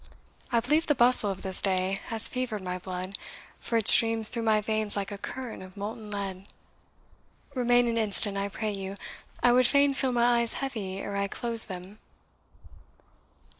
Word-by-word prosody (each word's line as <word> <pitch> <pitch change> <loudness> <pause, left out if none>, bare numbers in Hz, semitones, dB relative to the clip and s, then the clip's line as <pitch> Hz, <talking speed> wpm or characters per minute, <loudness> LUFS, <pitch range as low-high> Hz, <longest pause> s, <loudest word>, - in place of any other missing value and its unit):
I 235 - +2
believe 300 +7 -1
the 295 - +1
bustle 245 -3 +4
of 190 -1 -7
this 190 -1 +2
day 190 0 -2
has 225 -1 +3
fevered 245 -6 -5
my 180 0 -5
blood, 185 +1 -7 0.4
for 230 - -3
it 225 -1 -2
streams 225 -1 +6
through 235 - -5
my 220 -1 +1
veins 215 0 -2
like 200 0 -5
a 205 - -7
current 255 +2 -8
of 185 +1 -14
molten 210 +1 -8
lead. 195 -2 -7 1.1
Remain 245 -1 +1
an 230 0 -2
instant, 205 -1 +5
I 200 0 -4
pray 215 +2 -5
you 195 -1 -7 0.5
I 245 - +4
would 250 0 +3
fain 280 0 +2
feel 265 -1 -2
my 240 0 +1
eyes 235 - -2
heavy 215 -9 -6
ere 200 +1 -7
I 200 0 -2
closed 230 +2 +5
them." 190 +2 -10
215 Hz, 175 wpm, -26 LUFS, 195-240 Hz, 1.1 s, streams